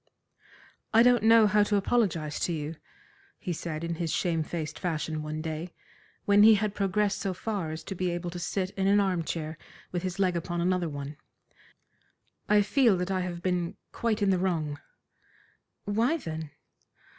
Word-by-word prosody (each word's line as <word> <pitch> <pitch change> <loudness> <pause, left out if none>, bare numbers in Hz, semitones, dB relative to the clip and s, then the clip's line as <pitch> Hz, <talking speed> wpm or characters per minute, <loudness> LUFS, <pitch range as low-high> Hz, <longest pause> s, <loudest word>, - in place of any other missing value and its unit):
"I 230 - +8
don't 245 0 +5
know 225 0 +6
how 210 0 +4
to 205 0 +2
apologise 190 -8 +1
to - - 0
you," 155 0 -4 0.6
he 180 - -4
said 160 -1 -5
in 170 0 -2
his 165 -2 -1
shame 170 -3 0
faced 155 0 -4
fashion 160 -2 -2
one 155 +1 -4
day, 160 +2 -5 0.5
when 205 0 +5
he 220 +1 +8
had 210 0 -1
progressed 205 0 0
so 190 -2 -2
far 200 -5 -3
as 160 +1 -6
to - - -5
be 185 -1 -1
able 175 0 -3
to 175 - -6
sit 185 +2 -2
in 195 -1 -1
an 200 +1 +5
arm 185 -4 +1
chair 160 -1 -4 0.3
with 175 - -2
his 185 +1 -4
leg 185 -3 +2
upon 175 +1 -2
another 180 -1 +1
one; 145 0 -6 1.3
"I 210 0 +5
feel 230 -1 +3
that 180 +2 -2
I 190 - +1
have 180 -1 -4
been 180 -2 -1
quite 225 -2 -1
in 195 - +4
the 185 - +2
wrong." 160 -6 -1 1.1
"Why, 230 +10 +1
then?" 160 - -6
180 Hz, 180 wpm, -28 LUFS, 165-205 Hz, 1.3 s, I